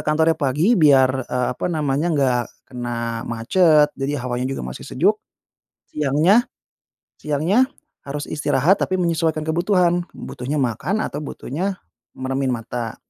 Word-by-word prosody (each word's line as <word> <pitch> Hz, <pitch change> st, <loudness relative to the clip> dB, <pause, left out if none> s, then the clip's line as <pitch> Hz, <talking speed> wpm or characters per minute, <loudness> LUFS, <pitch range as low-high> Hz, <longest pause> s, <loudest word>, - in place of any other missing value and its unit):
kantornya 160 Hz, +2 st, +2 dB
pagi 150 Hz, -, +1 dB
biar, 135 Hz, -, +4 dB
eee, 125 Hz, 0 st, 0 dB
apa 125 Hz, -, -3 dB
namanya, 150 Hz, -1 st, 0 dB
nggak 135 Hz, -6 st, +2 dB, 0.3 s
kena 120 Hz, -1 st, -3 dB
macet 150 Hz, +6 st, +3 dB
jadi 140 Hz, +2 st, -3 dB
hawanya 125 Hz, +1 st, -2 dB
juga 135 Hz, -, -4 dB
masih 60 Hz, 0 st, -8 dB
sejuk. -, -, +1 dB, 0.7 s
Siangnya 155 Hz, -, +3 dB, 0.7 s
siangnya, 165 Hz, -, +2 dB, 0.4 s
harus 145 Hz, +1 st, -4 dB
istirahat 150 Hz, +5 st, +2 dB
tapi 185 Hz, -, 0 dB
menyesuaikan 165 Hz, -3 st, 0 dB
kebutuhan, 175 Hz, +2 st, +1 dB
butuhnya 130 Hz, +4 st, -5 dB
makan 145 Hz, -, -1 dB
atau 145 Hz, -, -4 dB
butuhnya 165 Hz, +6 st, -4 dB, 0.4 s
meremin 135 Hz, +1 st, -2 dB
mata. 115 Hz, 0 st, -5 dB
150 Hz, 125 wpm, -21 LUFS, 130-170 Hz, 0.7 s, biar